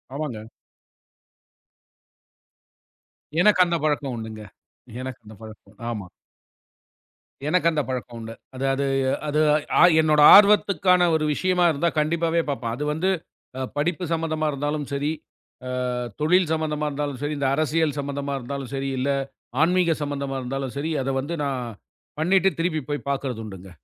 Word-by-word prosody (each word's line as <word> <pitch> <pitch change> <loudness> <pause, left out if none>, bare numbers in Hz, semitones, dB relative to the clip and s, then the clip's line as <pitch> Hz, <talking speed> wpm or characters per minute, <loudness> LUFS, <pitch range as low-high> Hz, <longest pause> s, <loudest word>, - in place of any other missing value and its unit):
ஆமாங்க. 120 -7 -5 2.9
எனக்கு 205 -1 +5
அந்தப் 170 -3 -1
பழக்கம் 145 -3 0
உண்டு-ங்க. 110 -1 -7 0.6
எனக்கு 130 -1 -6
அந்தப் 105 -1 -14
பழக்கம் 110 -1 -13
ஆமா. 105 -6 -5 1.4
எனக்கு 170 +1 +2
அந்தப் 150 -4 -1
பழக்கம் 125 -2 -5
உண்டு. 115 0 -7 0.2
அது 135 - -3
அது 140 +1 -1 0.4
அது 150 +1 +1 0.4
ஆ - - +6 0.2
என்னோட 155 -1 +3
ஆர்வத்துக்கான 200 -3 +5
ஒரு 155 -1 0
விஷயமா 180 +2 +1
இருந்தா, 155 +4 0
கண்டிப்பாகவே 165 +2 +1
பார்ப்பேன். 120 -5 -2
அது 150 - -3
வந்து 180 +5 0 0.5
அ - - -2 0.2
படிப்பு 175 +4 -1
சம்பந்தமா 155 -1 -1
இருந்தாலும் 145 +1 -2
சரி, 145 +2 -1 0.6
அ - - -4 0.5
தொழில் 175 +1 +3
சம்பந்தமா 150 -1 -1
இருந்தாலும் 145 -2 -4
சரி, 145 +1 -2
இந்த 135 - +1
அரசியல் 155 -1 0
சம்பந்தமா 140 0 -3
இருந்தாலும் 135 +1 -6
சரி, 135 0 -2
இல்ல 140 +2 0 0.5
ஆன்மீக 175 -1 +2
சம்பந்தமா 140 -1 -3
இருந்தாலும் 135 +1 -4
சரி, 155 +3 -2
அதை 135 +1 -1
வந்து 165 +5 -4
நான் 135 -3 -2 0.6
பண்ணிட்டு 190 +3 +3
திருப்பிப் 155 -4 -1
போய்ப் 145 -1 -4
பாக்குறது 135 -4 -2
உண்டு-ங்க. 95 -2 -10
145 Hz, 135 wpm, -24 LUFS, 135-160 Hz, 2.9 s, ஆ